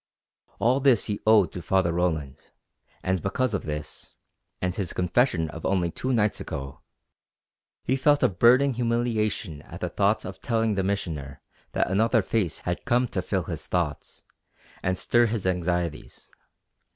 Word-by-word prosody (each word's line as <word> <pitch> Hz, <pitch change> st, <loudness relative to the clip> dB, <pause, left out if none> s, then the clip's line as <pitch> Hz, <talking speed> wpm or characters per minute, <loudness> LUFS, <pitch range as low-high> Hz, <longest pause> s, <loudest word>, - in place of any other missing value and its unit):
All 125 Hz, +4 st, +2 dB
this 130 Hz, -6 st, +4 dB
he 105 Hz, -, -3 dB
owed 105 Hz, -6 st, +5 dB
to 90 Hz, -, -6 dB
Father 95 Hz, -2 st, +1 dB
Roland, 80 Hz, -6 st, -1 dB, 0.6 s
and 95 Hz, -1 st, 0 dB
because 115 Hz, +4 st, 0 dB
of 100 Hz, -, -2 dB
this 75 Hz, 0 st, -6 dB, 0.4 s
and 90 Hz, 0 st, -1 dB
his 95 Hz, -5 st, -3 dB
confession 90 Hz, -1 st, +1 dB
of 80 Hz, -, -9 dB
only 90 Hz, -3 st, +1 dB
two 130 Hz, -, -3 dB
nights 105 Hz, -4 st, +1 dB
ago 70 Hz, 0 st, -6 dB, 1.0 s
he 130 Hz, -, +1 dB
felt 145 Hz, +2 st, +3 dB
a -, -, +7 dB
burning 125 Hz, +8 st, +4 dB
humiliation 115 Hz, -8 st, -1 dB
at -, -, -11 dB
the -, -, -2 dB
thought 105 Hz, +2 st, +1 dB
of 95 Hz, 0 st, -8 dB
telling 115 Hz, -2 st, +1 dB
the 95 Hz, -1 st, 0 dB
Missioner 80 Hz, -8 st, -3 dB, 0.3 s
that -, -, 0 dB
another 110 Hz, +2 st, +3 dB
face 95 Hz, -6 st, -1 dB
had 90 Hz, -1 st, -3 dB
come 125 Hz, 0 st, +2 dB
to 95 Hz, -, -1 dB
fill 95 Hz, 0 st, -1 dB
his -, -, -5 dB
thoughts, 85 Hz, -5 st, -3 dB, 0.6 s
and 90 Hz, 0 st, 0 dB
stir 120 Hz, +4 st, +3 dB
his 110 Hz, -3 st, -3 dB
anxieties. 90 Hz, -3 st, -2 dB
95 Hz, 155 wpm, -26 LUFS, 85-115 Hz, 1.0 s, a